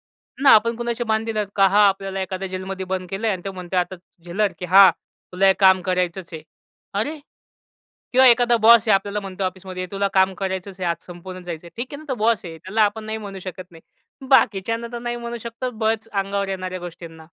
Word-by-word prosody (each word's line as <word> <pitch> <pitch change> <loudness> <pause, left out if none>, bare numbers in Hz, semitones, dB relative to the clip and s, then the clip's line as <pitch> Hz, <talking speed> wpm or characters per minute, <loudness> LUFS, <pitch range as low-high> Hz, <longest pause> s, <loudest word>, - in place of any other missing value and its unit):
आहे - - -16
ना 275 - +7
आपण 230 +2 +3
कुणाचे 240 0 -2
बांधील 220 0 -1
आहेत 210 -2 -1
का? 195 - +6
हां, 205 +2 +5
आपल्याला 195 0 -3
एखाद्या 190 +1 -4
जेलमध्ये 190 0 -5
बंद 185 -1 -4
केलंय 215 +3 -1
आणि 185 -3 -3
तो 195 - -4
म्हणत 180 -1 -8
आहे 180 - +4
आता 180 +1 -4 0.3
जेलर 195 +3 0
की 180 - -6
"हां, 190 +1 +8 0.4
तुला 195 +2 +2
हे 190 - +7
काम 190 -1 +6
करायचच 180 -1 -2
आहे." 160 - -7 0.6
अरे 300 +7 -3 0.9
किंवा 260 +1 +6
एखादा 240 0 +4
बॉस 230 0 +7
आहे - - +6
आपल्याला 200 +1 -1
म्हणतो 195 -1 -5
ऑफिसमध्ये, 185 0 -5
"ए - - -4
तुला 200 0 0
काम 190 0 +3
करायचंच 190 0 -4
आहे 180 - 0
आज 170 - -5
संपवून 185 +1 -9
जायचंय." 170 -1 -7
ठीक 235 - -3
आहे - - -5
ना 310 - -12
तर 265 - 0
बॉस 230 -3 +2
आहे. 165 -2 -8
त्याला 200 +7 0
आपण 215 +1 0
नाही 220 0 -4
म्हणू 200 -2 -8
शकत 185 0 -7
नाही. 165 -1 -16 0.5
बाकीच्यांना 230 -3 +2
तर 240 - -4
नाही 240 0 -4
म्हणू 235 0 -6
शकतो 235 +2 -5
बळंच 220 -1 -1
अंगावर 200 0 -1
येणाऱ्या 185 -1 -4
गोष्टींना. 165 -2 -10
195 Hz, 215 wpm, -22 LUFS, 185-220 Hz, 0.9 s, हां